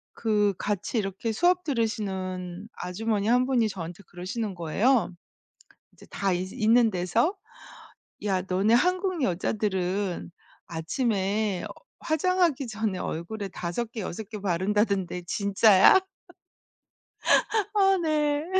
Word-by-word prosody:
그 210 -3 +1
같이 205 +3 -2
이렇게 200 +2 -2
수업 355 +9 +2
들으시는 190 - -3
아주머니 210 +3 -2
1 250 +2 +4
분이 240 -5 +2
저한테 175 0 -7
그러시는 190 +3 -4
거예요. 200 +7 +1 0.8
이제 - - -17
다 195 -2 0
있 185 +2 -3
있는 230 -1 +4
데서 220 - +1 0.9
"야 190 -3 +1
너네 195 +4 +1
한국 365 +4 +2
여자들은 190 -2 -1 0.4
아침에 195 +2 -1 0.3
화장하기 330 -4 +1
전에 215 -4 -2
얼굴에 195 +5 -4
5 185 +7 -4
개, 225 - -6
6 205 +2 -4
개 215 - -6
바른다던데 190 -1 0
진짜야?" 200 - +5 1.8
어 390 -1 +4
네. 300 -2 0
210 Hz, 225 characters per minute, -26 LUFS, 185-240 Hz, 1.8 s, 진짜야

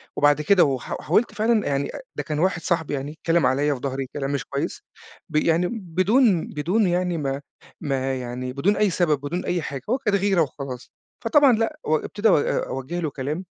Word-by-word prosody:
وبعد 145 +1 +3
كده 185 +4 +5
و 135 -2 +1
ح - - -6
حاولت 210 +8 +1
فعلًا 215 +1 +1
يعني 140 0 0
أ - - -6 0.2
ده - - -3
كان 150 -2 -3
واحد 180 0 +1
صاحبي 160 -2 -1
يعني، 140 +1 -3
اتكلم 165 +1 +1
عليَّ 145 +3 +2
في 135 - -6
ضهري 135 -1 -2
كلام 140 -1 -3
مش 140 0 -2
كويس 140 +5 -4 0.5
ب 155 - -8
يعني 165 +3 +3
بدون 195 0 +2
بدون 180 +8 0
يعني 175 0 0
ما 140 -2 -2 0.4
ما 135 -3 -1
يعني 125 +1 -5
بدون 190 +9 +1
أي 210 -1 +3
سبب 165 -5 +1
بدون 160 +6 -3
أي 175 -1 0
حاجة، 140 -3 -5
هو 250 - +2
كانت 210 -7 +1
غيرة 195 -2 +2
وخلاص، 135 -4 -5 0.3
فطبعًا 280 +3 +6
لأ 225 +8 -1
و 155 - +2
ابتدا 210 +7 0
أ 150 - +2
أوجه 135 +7 -4
له 160 -3 -1
كلام 145 +6 -4
160 Hz, 205 wpm, -23 LUFS, 140-190 Hz, 0.5 s, فطبعًا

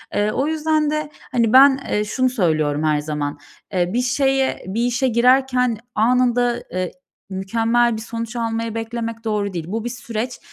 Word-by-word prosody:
Eee, 205 +1 +1
o 275 +6 0
yüzden 310 -1 +1
de, 305 0 -2 0.2
hani, 230 -3 +2
ben, 270 +1 +7
ııı, 210 0 +1
şunu 255 +4 +1
söylüyorum 155 - 0
her 155 -1 +2
zaman. 150 -1 -4 0.3
Eee, 180 -1 0
bir 245 - +2
şeye 270 +1 +1
bir 225 +5 -1
işe 245 +2 +1
girerken 250 0 +3 0.2
anında, 245 +1 +2
eee 185 0 -1
ı, - - -10 0.4
mükemmel 225 +5 +1
bir 220 - -5
sonuç 230 +1 -6
almayı 230 -1 -2
beklemek 230 0 -4
doğru 210 -3 -1
değil. 170 -3 -4
Bu 220 +4 -3
bir - - -1
süreç 240 0 -5
230 Hz, 170 wpm, -21 LUFS, 210-250 Hz, 0.4 s, ben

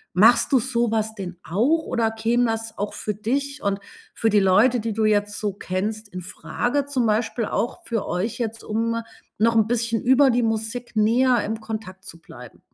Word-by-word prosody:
Machst 230 +8 +5
du 265 - +5
sowas 225 -3 0
denn 180 -4 -7
auch 265 - +1
oder 225 -1 0
käme 230 +2 +1
das 225 -1 -3
auch 205 +1 -3
für 210 - -4
dich 280 +7 -2
und 200 0 0 0.3
für 225 - +1
die 210 -1 +4
Leute, 210 +6 +4
die 225 0 -3
du 220 +1 0
jetzt 205 -1 +1
so 205 -2 -2
kennst, 205 +3 -3
infrage 205 +9 -3
zum 260 -5 0
Beispiel 220 +1 0
auch 245 +11 -2
für 230 -3 -2
euch 195 +6 -2
jetzt, 230 -1 -3
um 230 +1 -1 0.4
noch 230 +1 +3
'n 220 -1 +4
bisschen 230 -1 0
über 265 +2 +5
die 240 0 +1
Musik 225 +2 -3
näher 235 +2 +3
im 220 +1 -3
Kontakt 215 -4 -7
zu 165 - -10
bleiben? 125 -6 -13
225 Hz, 185 wpm, -23 LUFS, 210-240 Hz, 0.4 s, Machst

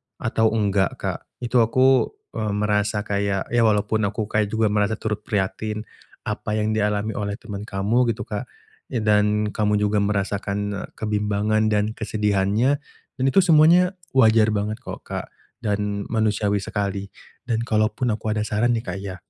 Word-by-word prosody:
atau 115 0 +1
nggak, 100 -3 +2
Kak. - - -3 0.2
Itu 120 +1 +2
aku, 130 +3 +4 0.2
mmm, 105 -2 -2
merasa 105 0 +1
kayak 100 -1 -1
ya 120 0 +3
walaupun 105 0 +1
aku 105 +2 -2
kayak 105 -1 +1
juga 110 0 +1
merasa 105 +1 +1
turut 110 -1 -3
prihatin 105 +2 -2 0.4
apa 105 - -3
yang 110 0 0
dialami 105 0 0
oleh 100 -1 -2
teman 105 -2 -8
kamu 105 +6 +1
gitu, 105 - -5
Kak. 105 +4 -5 0.4
Eee, 120 -4 -2
dan 105 0 +2
kamu 105 0 +1
juga 105 0 +1
merasakan, 100 0 -1
e 100 - -3 0.2
kebimbangan 105 0 0
dan 105 0 +1
kesedihannya. 105 +4 +1 0.4
Dan - - 0
itu 195 +9 +5
semuanya 175 +3 +5 0.2
wajar 110 -4 +5
banget 105 +1 -1
kok, 130 - -8
Kak, - - -5 0.3
dan 105 -2 -2
manusiawi 105 -2 +1
sekali. 100 0 -3 0.4
Dan 115 -2 0
kalaupun 110 +2 +1
aku 110 0 -4
ada 105 0 0
saran 110 +3 +1
nih, 115 - -5
Kak, 90 0 -4
ya. 100 -2 -5
105 Hz, 160 wpm, -23 LUFS, 105-110 Hz, 0.4 s, itu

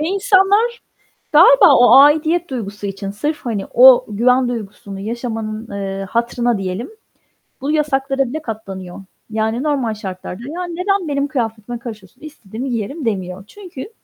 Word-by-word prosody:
Ve 305 - -1
insanlar 400 +4 +2 0.6
galiba 365 - +7
o 245 0 +6
aidiyet 315 +4 +4
duygusu 205 -5 -6
için, 195 0 -5
sırf 295 +10 -3
hani, 215 -5 -2
o 255 +1 +7
güven 250 +4 +2
duygusunu 200 -4 -7
yaşamanın, 225 0 -5
eee, 195 -1 -4
hatırına 235 +1 0
diyelim, 195 - -4 0.7
bu 280 +3 -1
yasaklara 275 -3 0
bile 310 +5 -5
katlanıyor. 195 - -7 0.3
Yani, 220 +3 -1
normal 275 -7 0
şartlarda 190 0 -7
"Ya, 355 +3 -4
neden 365 +1 -1
benim 280 -1 -1
kıyafetime 235 -4 -4
karışıyorsun, 225 -2 -10
istediğimi 260 -5 -7
giyerim." 245 +6 -4
demiyor. 190 -3 -3
Çünkü 360 - -10
240 Hz, 135 wpm, -18 LUFS, 210-300 Hz, 0.7 s, galiba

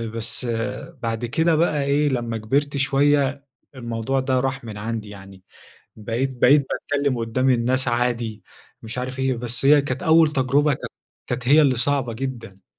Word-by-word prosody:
بس 115 +2 -3 0.6
بعد 115 +1 -2
كده 160 +7 +1
بقى 155 -3 +1
إيه، 145 +1 +2
لما 120 -3 -2
كبرت 140 +6 -1
شوية 140 0 +1 0.3
الموضوع 120 +1 -2
ده 130 -1 0
راح 135 +1 -2
من 110 -3 -8
عندي 110 0 -5
يعني، 95 -2 -13 0.5
بقيت 120 +5 -3
بقيت 140 +2 +5
باتكلم 140 -3 -1
قدام 120 +3 0
الناس 125 +1 +2
عادي، 120 -2 -1 0.4
مش 115 +2 -6
عارف 130 +1 -4
إيه. 130 -1 0
بس 120 +2 -3
هي 145 +1 +6
كانت 145 - -4
أول 160 -2 +5
تجربة 140 +2 +2
كانت - - -8 0.4
كانت 120 -1 -3
هي 150 +3 +6
اللي 135 -3 +3
صعبة 130 0 0
جدًا. 115 -6 -7
130 Hz, 160 wpm, -22 LUFS, 115-140 Hz, 0.6 s, هي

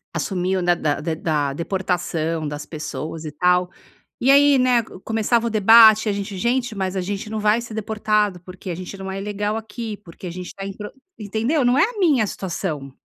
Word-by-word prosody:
assumiu, 185 0 -1
né, 175 0 +3
da 150 -3 -1
de 160 +1 -2
da 155 -3 0
da 135 - -5
deportação 165 -2 -2
das 145 0 -5
pessoas 155 0 -6
e 155 - -5
tal, 180 +1 +2 0.5
e 265 - +5
aí, 285 0 +6
né, 250 -2 +3
co 210 - -13
começava 225 +2 +1
o - - 0
debate 220 +1 +7
e - - +3
a - - +1
gente: 200 0 -5
"Gente, 240 +3 0
mas 190 -1 -2
a 190 - 0
gente 200 +3 -4
não 220 0 -3
vai 210 +2 +3
ser 235 -1 -8
deportado 215 -2 0
porque 185 +1 -10
a 175 - -2
gente 185 +3 -7
não 190 0 -6
é 195 - -4
ilegal 205 +1 -2
aqui, 220 0 -6
porque 185 -2 -13
a - - -5
gente 180 +1 -7
está 195 +2 -8
em 195 - -5
pro", 210 -1 -6 0.3
entendeu? 225 +8 0
Não 245 +2 +3
é 290 - +5
a 440 +2 -2
minha 295 - +3
situação. 160 -8 -4
200 Hz, 220 wpm, -22 LUFS, 180-225 Hz, 0.5 s, debate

